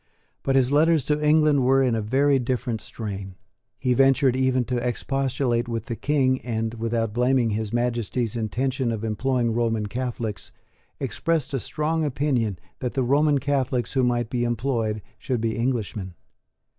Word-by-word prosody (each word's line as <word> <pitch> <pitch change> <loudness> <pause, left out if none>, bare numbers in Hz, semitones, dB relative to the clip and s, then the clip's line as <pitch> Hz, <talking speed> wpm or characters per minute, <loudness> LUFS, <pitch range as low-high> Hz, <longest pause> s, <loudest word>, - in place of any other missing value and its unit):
But 135 - 0
his 130 -1 +3
letters 155 -1 +4
to 150 +1 0
England 150 -2 +4
were 135 +1 +4
in 125 -3 +2
a 110 - 0
very 135 +5 +2
different 120 -3 -2
strain. 100 -4 -6 0.4
He 125 - +1
ventured 135 0 +4
even 130 -1 +2
to 125 +2 -1
expostulate 125 0 -1
with 115 -2 -3
the 120 -3 -4
King, 130 -1 +1
and, 115 -1 -2
without 115 -1 -1
blaming 125 -1 +2
His 105 0 -2
Majesty's 120 -1 -1
intention 120 +3 -1
of 110 -1 -4
employing 120 +1 0
Roman 115 -2 0
Catholics, 120 -1 -4 0.5
expressed 160 -4 -1
a 135 - 0
strong 155 +5 -1
opinion 130 - 0 0.2
that 125 -2 -3
the 135 - +1
Roman 145 +3 +3
Catholics 135 -2 -1
who 135 - +2
might 120 -2 0
be 120 -1 0
employed 115 -3 -1 0.2
should 125 -3 -2
be 110 -1 -1
Englishmen. 110 -6 -2
125 Hz, 155 wpm, -24 LUFS, 115-135 Hz, 0.5 s, letters